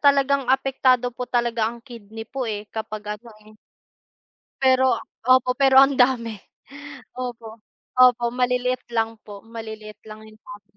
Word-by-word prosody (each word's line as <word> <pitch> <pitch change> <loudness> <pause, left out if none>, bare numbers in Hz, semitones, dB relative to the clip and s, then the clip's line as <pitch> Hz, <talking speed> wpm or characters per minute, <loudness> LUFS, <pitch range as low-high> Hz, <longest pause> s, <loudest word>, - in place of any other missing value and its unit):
talagang 280 -2 +3
apektado 260 -2 +2
po 250 +1 -6
talaga 235 -2 0
ang 235 +1 -9
kidney 225 -3 -10
po, 260 0 -5
eh, 210 -1 -4
kapag 210 -1 -6
ano, 235 0 -15
eh. 215 0 -19 1.0
Pero 260 0 +3 0.3
opo, 255 0 +4
pero 270 -1 +4
ang 275 0 +4
dami. 235 -4 +1 0.8
Opo, 230 -3 -7 0.4
opo, 250 -1 +5
maliliit 250 0 0
lang 225 -1 -1
po, 205 -1 -11
maliliit 220 -2 -9
lang 215 0 -11
yung 215 0 -17
tablet. 200 -1 -14
240 Hz, 140 wpm, -23 LUFS, 220-255 Hz, 1.0 s, opo